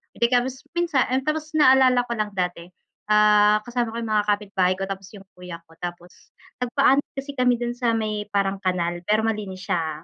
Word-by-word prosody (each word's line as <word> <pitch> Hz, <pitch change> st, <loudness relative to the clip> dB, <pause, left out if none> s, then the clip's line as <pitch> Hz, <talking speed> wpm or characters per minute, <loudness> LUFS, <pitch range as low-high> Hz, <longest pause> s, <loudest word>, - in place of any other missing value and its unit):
Pakatapos 250 Hz, +3 st, 0 dB
minsan, 335 Hz, -7 st, +1 dB, 0.2 s
tapos 305 Hz, +1 st, -3 dB
naalala 260 Hz, -4 st, +5 dB
ko 240 Hz, -, -9 dB
lang 215 Hz, 0 st, 0 dB
dati, 180 Hz, -2 st, -3 dB, 0.4 s
ah, 210 Hz, 0 st, +5 dB
kasama 240 Hz, -2 st, -3 dB
ko -, -, -3 dB
'yung 220 Hz, -, -4 dB
mga 210 Hz, -1 st, +2 dB
kapitbahay 195 Hz, -3 st, +1 dB
ko, 195 Hz, -, -5 dB
tapos 195 Hz, -1 st, -6 dB
'yung 195 Hz, -, -12 dB
kuya 180 Hz, -2 st, -9 dB
ko, 165 Hz, -, -20 dB
tapos 175 Hz, 0 st, -7 dB, 0.5 s
nagpaanod 270 Hz, +3 st, +2 dB
kasi 275 Hz, +1 st, -5 dB
kami 250 Hz, -1 st, +3 dB
do'n 240 Hz, 0 st, -2 dB
sa 235 Hz, -2 st, +1 dB
may 215 Hz, -2 st, -3 dB
parang 195 Hz, -1 st, 0 dB
kanal 175 Hz, -2 st, -1 dB
pero 215 Hz, +1 st, +2 dB
malinis 205 Hz, -4 st, -3 dB
siya, 160 Hz, -2 st, -2 dB
210 Hz, 180 wpm, -23 LUFS, 185-245 Hz, 0.5 s, naalala